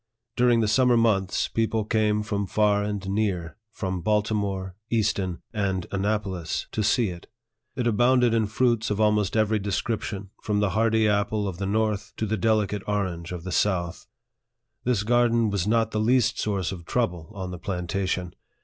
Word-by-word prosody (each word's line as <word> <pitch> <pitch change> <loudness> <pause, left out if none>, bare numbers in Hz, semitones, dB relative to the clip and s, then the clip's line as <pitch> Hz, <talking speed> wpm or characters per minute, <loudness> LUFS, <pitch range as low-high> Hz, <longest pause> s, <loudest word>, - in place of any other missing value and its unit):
During 120 -1 +4
the 110 - +1
summer 125 +2 +4
months, 100 -5 +2
people 110 -1 0
came 105 -1 +1
from 100 -2 -2
far 105 0 +2
and 105 -2 -3
near 95 -5 -1 0.2
from 95 -5 -3
Baltimore, 100 -2 -1
Easton, 100 -5 0
and 95 -4 -1
Annapolis 100 -4 -2
to - - -2
see 105 +1 +2
it. 85 -1 -9 0.5
It 125 -3 -2
abounded 120 +1 +3
in 110 -2 +2
fruits 115 0 +1
of 105 0 -1
almost 105 -1 +2
every 110 0 +2
description, 100 0 -3
from 105 -1 0
the 105 -2 +1
hardy 110 +1 +2
apple 105 0 +1
of 90 -2 -5
the 100 - -2
north 105 0 -1
to 110 - -1
the 110 +1 0
delicate 105 -1 +1
orange 95 -5 -2
of 90 -2 -6
the 95 - -5
south. 90 -3 0 0.8
This 120 -5 +1
garden 115 -1 +3
was 100 -1 -1
not 115 0 +2
the 105 - -1
least 115 -1 +2
source 100 -4 -1
of 90 -3 -7
trouble 90 -7 -1
on 95 -2 -5
the 90 - -7
plantation. 90 0 -2
105 Hz, 165 wpm, -25 LUFS, 95-110 Hz, 0.8 s, During